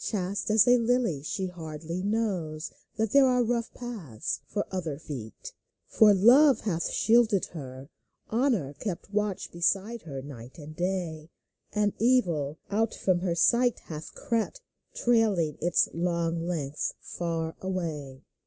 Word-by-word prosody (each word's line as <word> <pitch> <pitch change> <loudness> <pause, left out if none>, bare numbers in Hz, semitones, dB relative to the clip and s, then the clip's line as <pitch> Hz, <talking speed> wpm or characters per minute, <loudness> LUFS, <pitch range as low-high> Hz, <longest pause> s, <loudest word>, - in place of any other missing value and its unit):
Chaste 200 -1 -2
as 215 +2 +5
a 245 0 +6
lily, 230 - +1
she 190 +6 -3
hardly 165 -1 -6
knows 185 -7 -2 0.2
That 220 -2 0
there 280 -1 +6
are 250 -1 +3
rough 235 0 -1
paths 160 - -5
for 205 +4 -2
other 165 -6 -3
feet. 130 -8 -8 0.3
For 215 -2 +5
Love 250 +9 +6
hath 170 -6 -1
shielded 225 -4 +3
her; 135 -4 -8 0.4
Honor 225 - +1
kept 185 +5 -6
Watch 210 -2 -1
beside 195 +6 0
her 140 -4 -7
by - - -9
night 125 -3 -10
and 155 -1 -10
day; 175 -3 -3 0.4
And 210 -1 +1
Evil 175 - +2
out 220 +2 +1
from 185 -2 +1
her 175 -2 -1
sight 240 +7 +3
hath 155 -1 -8
crept, 230 - -2 0.3
Trailing 210 - +2
its 175 0 +3
slow 170 0 -1
length 165 -4 -3
far 165 -2 -3
away. 155 -8 -4
180 Hz, 140 wpm, -28 LUFS, 155-225 Hz, 0.4 s, a